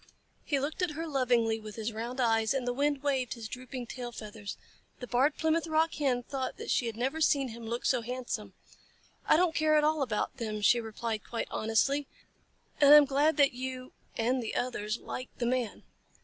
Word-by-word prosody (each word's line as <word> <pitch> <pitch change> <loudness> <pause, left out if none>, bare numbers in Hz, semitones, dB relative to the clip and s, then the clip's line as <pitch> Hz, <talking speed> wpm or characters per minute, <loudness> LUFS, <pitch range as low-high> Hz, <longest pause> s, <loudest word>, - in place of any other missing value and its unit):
He 285 -3 0
looked 300 +6 -3
at 355 -4 0
her 325 - -2
lovingly 240 -6 +2
with 215 -1 -9
his 225 0 -3
round 235 +4 -5
eyes, 225 0 +2
and 255 -2 -2
the 245 - +1
wind 285 +1 0
waved 265 -4 0
his 230 -2 -7
drooping 250 +1 -7
tail 245 0 -6
feathers. 210 -2 -7 0.4
The 250 - -5
Barred 265 +5 +2
Plymouth 320 +1 +1
Rock 320 +1 +2
Hen 260 -4 0
thought 265 +1 -4
that - - -4
she 240 - +2
had 225 -1 -5
never 270 +7 -1
seen 280 -4 +3
him 230 0 -8
look 235 +2 -3
so 255 -3 +2
handsome. 250 +2 -5 0.7
"I - - +6
don't 350 -1 +3
care 310 -1 +3
at 300 - +4
all 310 0 +2
about 255 0 -1
them," 215 -4 -3
she 240 +3 +5
replied 220 0 -4
quite 235 - -4
honestly, 270 +6 +1 0.7
"and 285 -1 +7
I 300 - +12
am 295 - +7
glad 285 +4 +2
that 280 -3 +5
you 255 0 -6 0.2
and 245 +3 +1
the 225 - -4
others 220 -3 -2
like 255 +1 -6
the 240 - -1
Man." 245 -2 -1
255 Hz, 205 wpm, -30 LUFS, 230-285 Hz, 0.7 s, I